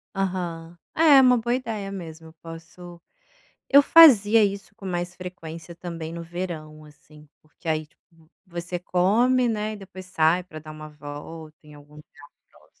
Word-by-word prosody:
Aham. 175 -3 -4 0.2
É, 310 -4 +6
uma 250 -1 +5
boa 240 +2 -1
ideia 220 -6 -5
mesmo, 165 -4 -9
eu 160 - -16
posso 170 +1 -12 0.7
eu 280 +1 +8
fazia 230 -10 +7
isso 200 +1 -4
com 205 - -14
mais 175 -1 -4
frequência 170 -2 -9
também 165 -2 -7
no 170 - -7
verão, 165 -3 -7
assim, 150 0 -18
porque 155 +2 -22
aí 155 -1 -1
tipo 160 +1 -29 0.2
você 175 0 -5
come, 230 +9 +2
né, 215 -1 -2
e - - -7
depois 190 -2 -11
sai 175 0 +1
pra 155 -4 -11
dar 155 0 -12
uma 155 0 -10
volta 150 +2 -10
em 150 - -15
algum 145 0 -16
tempo 150 0 -16 0.3
próximo. - - -24
175 Hz, 165 wpm, -24 LUFS, 160-200 Hz, 0.7 s, eu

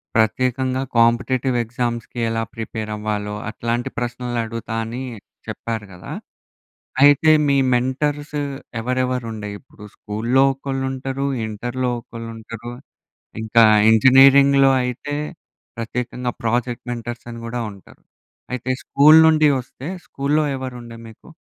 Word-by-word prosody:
ప్రత్యేకంగా 130 +3 +1 0.2
కాంపిటీటివ్ 125 +2 +2
ఎగ్జామ్స్‌కి 120 0 -4
ఎలా 115 0 -1
ప్రిపేర్ 110 -1 -5
అవ్వాలో, 105 -1 -3
అట్లాంటి 120 +2 -2
ప్రశ్నలు 120 0 -3
అడుగుతా 115 0 -5
అనీ 120 +3 -5 0.5
చెప్పారు 110 -2 -4
గదా! 90 - -10 0.9
అయితే, 145 +2 +6 0.2
మీ 140 - +3 0.2
మెంటర్స్ 145 +4 -1 0.4
ఎవరెవరుండే 125 -3 -2
ఇప్పుడు 105 -5 -16
స్కూల్‌లో 115 +6 0
ఒకళ్ళు 135 0 -4
ఉంటరు, 135 +1 -3 0.2
ఇంటర్‌లో 120 +4 -3
ఒకళ్ళు 115 0 -9
ఉంటరు. 115 +2 -8 0.7
ఇంకా 115 +1 +4 0.3
ఇంజనీరింగ్‌లో 135 +3 +6
అయితే 125 +4 -4 0.6
ప్రత్యేకంగా 125 +2 -3
ప్రాజెక్ట్ 120 +2 -1
మెంటర్స్ 120 0 -6
అని 115 - -8
గూడా 120 +1 -4
ఉంటరు. 100 -1 -17 0.5
అయితే 125 +1 -2
స్కూల్ 150 +3 +6
నుండి 155 -1 +5
వస్తే, 130 +3 -9 0.2
స్కూల్‌లో 150 +2 0
ఎవరుండే 125 -3 -7
మీకు, 110 - -17
120 Hz, 110 wpm, -21 LUFS, 115-130 Hz, 0.9 s, అయితే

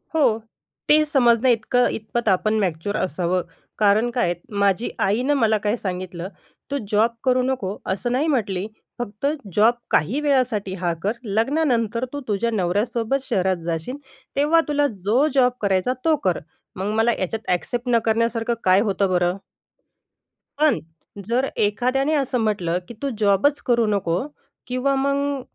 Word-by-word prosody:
हो, 230 -8 +3 0.5
ते 305 +1 +6
समजण्याइतकं 245 -3 +3
इतपत 225 +2 -4
आपण 200 +3 +2
मॅच्युअर 190 +2 -1
असावं, 180 +1 0 0.4
कारण 215 +3 +3
काय 240 -3 +1
आहे - - +1 0.3
माझी 200 +3 +2
आईनं 240 +9 +1
मला 225 -6 +3
काय 210 +1 0
सांगितलं, 180 -3 -5 0.4
"तू 280 - 0
जॉब 220 +3 +3
करू 255 -1 +3
नको" 250 -7 -2
असं 240 +6 -2
नाही 275 +5 +1
म्हटली. 205 - 0 0.3
"फक्त 210 +1 -5 0.3
जॉब 220 +3 +5 0.2
काही 205 - +2
वेळासाठी 250 -9 +1
हा 175 -2 +1
कर, 205 - +1
लग्नानंतर 230 +1 0
तू 285 - -3
तुझ्या 220 +2 0
नवऱ्यासोबत 225 +7 0
शहरात 185 -6 0
जाशील. 170 - -3 0.4
तेव्हा 305 +4 +4
तुला 290 -1 +2 0.2
जो 240 +9 +3
जॉब 255 -2 +4
करायचा 195 +4 +1
तो 320 -1 +4
कर." 180 -3 +1 0.4
मग 195 +2 -2
मला 225 +2 +3
याच्यात 220 +4 -3
ॲक्सेप्ट 240 +7 -2
न 235 -1 +4
करण्यासारखं 230 +1 +1
काय 185 +1 +5
होतं 200 -2 0
बरं? 180 +1 +1 1.2
पण 305 -1 +3 0.5
जर 240 +5 +1
एखाद्याने 255 +8 +1
असं 265 -3 0
म्हटलं 195 -6 0
की - - -8
"तू 280 - -1
जॉबच 210 +8 +3
करू 235 -2 +3
नको" 185 -4 0 0.5
किंवा 255 +2 0
मग 280 0 0
225 Hz, 145 wpm, -22 LUFS, 195-255 Hz, 1.2 s, ते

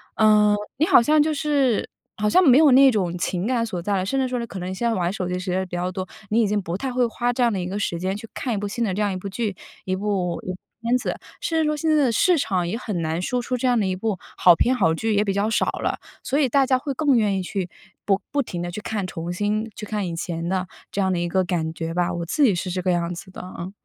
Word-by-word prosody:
嗯， 210 -1 +5 0.2
你 310 - +3
好 370 - +6
像 300 +5 +4
就 310 0 0
是 280 -6 +1 0.3
好 210 0 +1
像 370 - +5
没 270 -5 +7
有 300 -3 +6
那 270 0 +7
种 180 -6 -1
情 180 +3 -2
感 240 -3 +1
所 190 -6 -4
在 200 +3 -1
了， 185 - -1
甚 270 +7 0
至 260 - +1
说 250 -1 -2
呢， 235 - -3
可 190 - -7
能 185 +1 -4
现 235 +5 -3
在 - - +1
玩 180 -3 0
手 190 -3 -3
机 180 - -1
的 - - -2
时 185 0 -3
间 185 +1 0
比 175 - -6
较 180 +1 -1
多， 185 0 -4 0.2
你 225 +2 +3
已 215 - +2
经 205 0 0
不 170 -1 -4
太 265 +5 -3
会 250 0 +2
花 240 +2 -1
这 255 - -2
样 235 -2 +3
的 195 - -1
一 180 - -3
个 195 +3 -3
时 175 -4 -1
间 185 +1 -1
去 225 - -9
看 250 - -2
一 210 - -1
部 205 - -2
新 230 +4 -2
的 195 - 0
这 205 - -2
样 205 -2 +1
一 - - -3
部 195 +2 -6
剧、 205 0 -2 0.3
一 185 0 0
部 190 -3 -1 0.4
片 235 +2 +2
子。 - - -3 0.3
甚 325 -1 0
至 - - +1
说， 305 0 0
现 320 +1 -1
在 295 - +4
的 240 - +2
市 350 - +3
场 185 -9 0
也 200 +6 -2
很 210 -8 -3
难 160 +2 -1
说 245 +6 -1
出 250 +1 -2
这 250 - -3
样 245 -2 +3
的 205 - +1
一 185 - -1
部 200 -1 -2 0.2
好 180 - +7
片、 250 +9 +2
好 165 -10 +3
剧 220 +6 -1
也 205 - +3
比 200 - 0
较 205 +2 0
少 225 - +2 0.2
了， - - 0 0.3
所 280 - 0
以 275 -4 +3
大 275 +2 +4
家 260 0 +3
会 275 +2 -4
更 285 -1 +2
愿 205 -3 +2
意 - - -3
去 185 0 -3 0.4
不 200 0 +2
不 285 - +1
停 175 -9 -5
地 175 - -3
去 210 - -6
看 205 -3 -3
重 170 0 -5
新 210 +3 -1
去 210 - -6
看 210 -2 -2
以 170 - -4
前 170 0 -3
的， 185 -1 -1 0.2
这 200 - -3
样 190 -1 +1
的 175 - 0
一 175 0 -1
个 185 +2 +2
感 160 -3 -1
觉 165 0 -4
吧。 175 0 0
我 170 -1 -3
自 295 - +1
己 235 -7 +5
是 180 +2 -3
这 185 - -2
个 180 0 +1
样 175 0 0
子 185 - -10
的 - - -10
啊。 180 0 -7
205 Hz, 325 characters per minute, -23 LUFS, 180-245 Hz, 0.4 s, 没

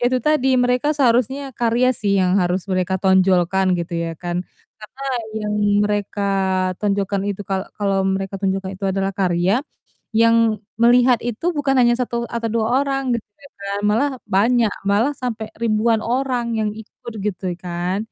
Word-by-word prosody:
ya - - 0
itu 255 - +2
tadi 300 -4 +3 0.2
mereka 250 +3 +1
seharusnya 255 0 +2 0.2
karya 240 +1 +2
sih 205 -2 +1
yang 185 -1 +2
harus 180 +1 -1
mereka 185 0 0
tonjolkan 190 -1 +3
gitu 170 0 -4
ya 165 - -4
kan, 175 0 -2 0.5
karena 255 +6 -11 0.4
yang 210 -1 -2 0.3
mereka 205 0 -2 0.6
tonjolkan 200 -1 0
itu 200 +1 -5
kalau 190 0 -1
kalau 195 -1 +1 0.2
mereka 195 0 -4
tonjolkan 190 0 -1
itu 195 - -7
adalah 195 0 -1
karya 185 +5 +1 0.5
yang 230 -1 +3 0.2
melihat 245 +1 +5
itu 240 +5 -4
bukan 275 -2 +1
hanya 240 -1 +5
1 250 -1 -2
atau 235 -1 -3
2 220 -1 +1 0.2
orang 275 0 -1 0.2
gitu 220 - -10
ya 280 - -13
kan, 200 0 -3
malah 230 +8 +2 0.3
banyak, 230 +2 +3 0.2
malah 205 +6 +2
sampai 225 -3 -3
ribuan 225 0 +2
orang 250 0 0
yang 215 -1 0
ikut 220 +1 -12
gitu 195 -2 -3 0.2
kan, 175 +1 -2
210 Hz, 160 wpm, -20 LUFS, 190-240 Hz, 0.6 s, melihat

